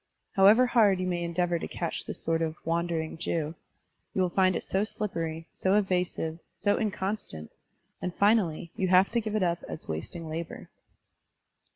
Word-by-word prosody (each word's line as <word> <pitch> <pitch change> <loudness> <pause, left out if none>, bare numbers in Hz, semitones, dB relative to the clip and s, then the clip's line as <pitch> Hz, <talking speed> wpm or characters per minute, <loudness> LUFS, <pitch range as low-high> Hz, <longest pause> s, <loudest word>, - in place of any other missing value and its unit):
However 205 +6 +7
hard 215 -6 +4
you 185 - -1
may 175 -1 -1
endeavor 170 0 0
to - - -4
catch 170 - -4
this - - -6
sort 165 0 +1
of 160 -1 -1
"Wandering 165 -1 -1
Jew,'* 160 -2 -1 0.6
you 190 - +2
will 180 - +1
find 185 0 +3
it - - -2
so 195 +2 0
slippery, 165 -7 -3
so 190 +1 +1
evasive, 180 -5 0 0.2
so 205 0 +1
inconstant, 195 - -3 0.5
and 180 - -2
finally 195 -6 +2
you 190 - 0
have 185 +1 +5
to 235 - +1
give 215 -1 -3
it 215 - +2
up 170 -1 0
as - - -7
wasting 120 - -5
labor. 160 +1 -6
180 Hz, 170 wpm, -29 LUFS, 165-200 Hz, 0.6 s, However